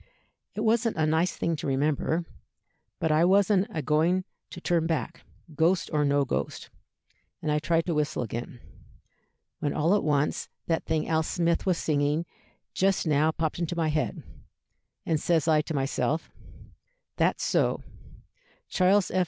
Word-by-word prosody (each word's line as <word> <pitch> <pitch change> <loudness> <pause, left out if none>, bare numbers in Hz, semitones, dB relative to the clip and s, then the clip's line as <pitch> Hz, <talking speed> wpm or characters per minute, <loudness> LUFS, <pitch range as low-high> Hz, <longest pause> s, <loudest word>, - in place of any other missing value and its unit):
It 215 - -3
wasn't 225 -1 +1
a 155 - +2
nice 160 +3 +1
thing 170 - 0
to 145 - -4
remember; 150 +4 0 0.7
but 160 - 0
I 155 +2 +4
wasn't 195 +2 +4
agoing 160 - +1 0.3
to 175 - -9
turn 170 -2 +1
back, 160 -2 -2 0.3
ghost 165 +4 +1
or 150 -1 +2
no 140 0 +2
ghost, - - -4 0.7
and 150 - -2
I 150 - +2
tried 165 +2 +1
to 175 - -1
whistle 150 -4 -1
again, 120 +1 -6 1.0
when 145 - -1
all 160 +5 +2
at 205 - +2
once 150 -1 0 0.2
that 165 -1 -1
thing 155 - -1
Al 160 -1 +2
Smith 170 +2 0
was 180 -2 +2
singing 150 +2 0 0.5
just 195 0 +1
now 155 0 +3
popped 160 0 -2
into 175 0 -2
my 165 -2 0
head, 155 0 -2 0.8
and 160 -2 +1
says 165 -1 +1
I 155 -1 +4
to 155 - -5
myself, 140 +3 -1 0.9
'That's - - +1
so, - - +1 0.9
Charles 190 +1 +3
F. 185 - +1
160 Hz, 155 wpm, -27 LUFS, 150-175 Hz, 1.0 s, I